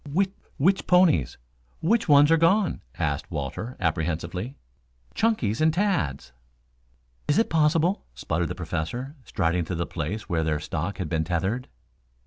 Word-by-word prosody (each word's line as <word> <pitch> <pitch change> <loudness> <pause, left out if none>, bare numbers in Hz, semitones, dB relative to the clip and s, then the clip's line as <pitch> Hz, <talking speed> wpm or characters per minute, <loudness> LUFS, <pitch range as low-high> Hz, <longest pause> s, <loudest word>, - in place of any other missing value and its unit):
"Whi 195 +7 +3 0.3
which 190 +7 +2
ponies 180 - +4 0.4
which 225 +4 +1
ones 145 +1 +7
are - - +7
gone?" 170 - +2 0.2
asked 75 -1 -2
Walter 80 - -5
apprehensively. 85 - -2 0.6
"Chunky's 155 - +1
and 160 0 +5
Tad's." 155 - -1 1.0
"Is 150 - +2
it 225 - +2
possible?" 165 +4 +2
sputtered 80 +7 -1
the - - -4
Professor, 125 - -4
striding 85 -1 0
to 90 - -3
the 85 +1 -1
place 95 +6 -4
where 85 -5 0
their 75 -1 0
stock 85 +6 -3
had 95 - -3
been 80 -1 0
tethered. 95 +9 -1
100 Hz, 140 wpm, -26 LUFS, -, 1.0 s, ones